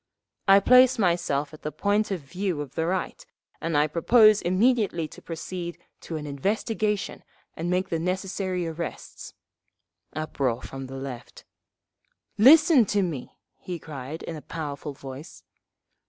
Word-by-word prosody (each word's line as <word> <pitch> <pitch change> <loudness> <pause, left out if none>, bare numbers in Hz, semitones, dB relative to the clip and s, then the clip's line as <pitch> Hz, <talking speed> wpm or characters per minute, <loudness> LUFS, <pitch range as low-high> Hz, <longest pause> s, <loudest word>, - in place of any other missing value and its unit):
"… - - -53
I - - +7
place 255 +5 +6
myself 170 -7 0
at 155 - -12
the 150 - -4
point 205 +4 0
of 190 -4 -3
view 180 +3 -3
of 140 -3 -8
the 160 0 -1
Right, 190 - -2 0.4
and 165 -2 0
I 145 - +4
propose 215 +7 +5
immediately 190 -3 +2
to - - -14
proceed 170 +1 -6 0.2
to 165 - -6
an 150 - -6
investigation 210 - -2 0.3
and 165 +2 -3
make 185 +1 0
the 165 - -1
necessary 185 0 -2
arrests." 165 0 -7 0.8
(Uproar 135 -6 -2
from 135 -1 -7
the 135 +1 -8
Left.) 135 -3 -8 0.9
"Listen 300 - +7
to 200 0 +1
me!" 155 -8 -5 0.2
he 180 -1 -5
cried 150 -1 -8
in 165 - -5
a 155 - -8
powerful 145 -2 -6
voice. 135 +3 -10
170 Hz, 145 wpm, -26 LUFS, 150-200 Hz, 0.9 s, I